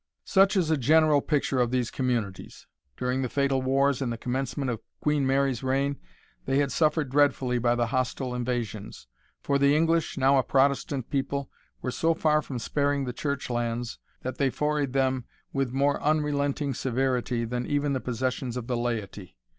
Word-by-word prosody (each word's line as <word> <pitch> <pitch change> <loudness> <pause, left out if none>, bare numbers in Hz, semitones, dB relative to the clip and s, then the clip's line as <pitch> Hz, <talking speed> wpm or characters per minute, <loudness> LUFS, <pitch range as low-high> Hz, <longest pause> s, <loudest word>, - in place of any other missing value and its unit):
Such 195 0 +4
is 165 -4 +2
a 160 - +3
general 150 +2 +4
picture 140 -3 0
of 120 -1 +2
these 125 -1 -1
communities. 120 -7 -3 0.3
During 125 +1 -1
the 130 - -2
fatal 140 -1 +1
wars 135 +1 +2
in 130 - -1
the 115 - -3
commencement 130 +2 -2
of 115 - -5 0.2
Queen 150 -2 +1
Mary's 135 -2 +1
reign, 135 +2 0 0.5
they 135 - +1
had 140 -1 +1
suffered 150 -1 +1
dreadfully 135 -3 +2
by 120 0 +2
the 120 0 +1
hostile 130 +1 -2
invasions. 120 - -4 0.4
For 140 -1 +1
the 140 +1 +4
English, 165 +1 +1
now 135 0 +4
a - - +2
Protestant 135 -1 +1
people, 140 0 -2 0.3
were 125 - -1
so 165 +5 +1
far 155 -1 +2
from 135 -4 -6
sparing 140 +3 0
the 125 - -4
church 140 +1 -3
lands, 120 -1 -2 0.2
that 130 0 -5
they 140 -2 +3
forayed 150 -1 -1
them 130 -2 +1 0.3
with 135 -3 0
more 140 +2 +1
unrelenting 145 -2 0
severity 125 -1 -1
than 125 +1 -3
even 145 -1 0
the 130 - 0
possessions 125 0 -2
of 125 - -4
the 125 0 -1
laity. 110 -6 -4
135 Hz, 175 wpm, -27 LUFS, 125-145 Hz, 0.5 s, Such